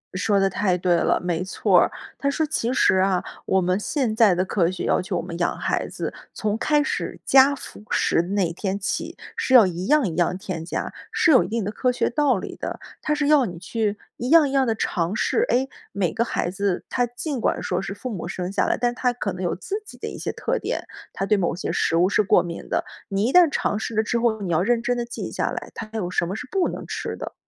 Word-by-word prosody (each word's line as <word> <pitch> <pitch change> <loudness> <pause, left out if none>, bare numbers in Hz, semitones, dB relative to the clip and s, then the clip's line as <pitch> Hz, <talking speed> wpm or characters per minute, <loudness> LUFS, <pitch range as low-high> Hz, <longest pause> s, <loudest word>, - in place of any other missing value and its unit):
说 200 +2 +2
得 195 - +3
太 185 -1 +1
对 180 0 +2
了， 170 - +2
没 175 0 -1
错 190 - +3
儿。 - - +1 0.3
他 280 - +1
说 310 +3 0
其 270 -6 -1
实 190 - +4
啊， 185 -1 +2 0.2
我 190 - +2
们 185 +2 +1
现 235 0 -1
在 220 -5 +5
的 185 +2 +1
科 180 -3 +1
学 185 -1 -4
要 - - +2
求 180 - -3
我 - - -1
们 170 0 -6
养 175 - 0
孩 - - -1
子， - - -5 0.2
从 210 -1 -1
开 295 +5 +2
始 - - -3
加 270 +1 +6
辅 260 - -10
食 - - +2
的 170 - -6
那 195 -4 +1
天 190 +2 -2
起， 190 - -3 0.2
是 260 - -1
要 235 -5 +9
一 180 0 -3
样 295 -5 +4
一 165 - -4
样 175 +1 +1
添 185 -4 -5
加， 170 - -4 0.2
是 330 - +3
有 255 - +6
一 - - -5
定 225 0 -2
的 200 - -2
科 250 +3 +1
学 245 - 0
道 265 -3 +2
理 - - -6
的， - - -5 0.2
它 300 - 0
是 295 -1 0
要 295 -3 +5
你 175 -5 -6
去 210 +4 -2 0.2
一 245 - -3
样 320 -1 +7
一 - - -4
样 270 -2 +2
地 225 - +1
尝 175 -3 -1
试。 445 - +1
哎， 260 +2 +2 0.2
每 190 -3 -1
个 230 - +1
孩 175 -6 -2
子 195 -1 -1
他 245 - +1
尽 250 +2 -4
管 - - 0
说 180 +1 -1
是 195 - -5
父 255 +4 -6
母 180 -5 -5
生 180 0 -4
下 - - +1
来， - - +1
但 240 0 +1
他 250 0 +1
可 210 -6 -3
能 180 - -7
有 175 - 0
自 405 - -4
己 - - -12
的 - - -5
一 - - -6
些 - - -2
特 - - -2
点， - - -3 0.3
他 195 - -3
对 210 +1 +3
某 175 -2 0
些 - - -3
食 - - +1
物 175 +2 +4
是 200 - +3
过 200 - +4
敏 170 -1 -7
的。 - - 0 0.2
你 200 +1 0
一 250 - 0
旦 355 -3 +7
尝 210 - -1
试 225 - -4
了 220 - +3
之 235 +2 0
后， 225 -2 +1
你 180 - -2
要 160 0 +3
认 235 +4 +1
真 245 +1 +1
地 240 -1 -2
记 240 - -6
下 - - -1
来， - - -6
他 220 - -7
有 195 -6 -2
什 175 - 0
么 190 - -3
是 220 - -6
不 380 -2 +1
能 - - -6
吃 - - -4
的。 - - -7
210 Hz, 280 characters per minute, -23 LUFS, 185-250 Hz, 0.3 s, 要